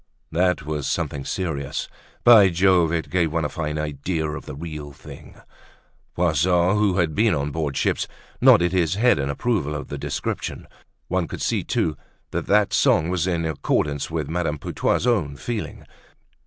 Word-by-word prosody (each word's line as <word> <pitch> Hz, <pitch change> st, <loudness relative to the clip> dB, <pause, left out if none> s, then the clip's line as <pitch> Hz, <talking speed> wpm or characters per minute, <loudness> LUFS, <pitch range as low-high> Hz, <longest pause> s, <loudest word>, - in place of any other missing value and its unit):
That 90 Hz, -2 st, +1 dB
was 75 Hz, -2 st, -3 dB
something 70 Hz, -1 st, -2 dB
serious. 80 Hz, -7 st, -3 dB, 0.4 s
By 110 Hz, -5 st, +8 dB
Jove! 90 Hz, -2 st, +3 dB
it 85 Hz, -1 st, -2 dB
gave 85 Hz, -4 st, +1 dB
one 80 Hz, -1 st, 0 dB
a -, -, -1 dB
fine 75 Hz, -3 st, -3 dB
idea 75 Hz, +2 st, -2 dB
of 75 Hz, +1 st, -6 dB
the -, -, -6 dB
real 75 Hz, -1 st, -7 dB
thing. -, -, -13 dB, 0.8 s
Poisson, 90 Hz, +3 st, +2 dB
who 105 Hz, -3 st, +2 dB
had 85 Hz, -4 st, +1 dB
been 105 Hz, +1 st, +3 dB
on 70 Hz, 0 st, -2 dB
board 75 Hz, -2 st, -2 dB
ship -, -, +1 dB, 0.4 s
nodded 85 Hz, 0 st, +6 dB
his 90 Hz, -2 st, +1 dB
head 120 Hz, -1 st, +3 dB
in 70 Hz, +1 st, -1 dB
approval 75 Hz, -, -1 dB
of 75 Hz, -, -6 dB
the 70 Hz, -, -5 dB
description. -, -, -4 dB, 0.4 s
One -, -, -1 dB
could -, -, -6 dB
see -, -, 0 dB
too 75 Hz, -2 st, -1 dB, 0.3 s
that -, -, -3 dB
that 105 Hz, 0 st, +3 dB
song 80 Hz, +1 st, +3 dB
was 90 Hz, -1 st, 0 dB
in 85 Hz, -2 st, 0 dB
accordance 75 Hz, -2 st, -1 dB
with -, -, -3 dB
Madame 80 Hz, -2 st, -1 dB
Putois's 85 Hz, -, -1 dB
own 95 Hz, -, +1 dB
feeling. 115 Hz, -, -5 dB
80 Hz, 170 wpm, -23 LUFS, 75-90 Hz, 0.8 s, By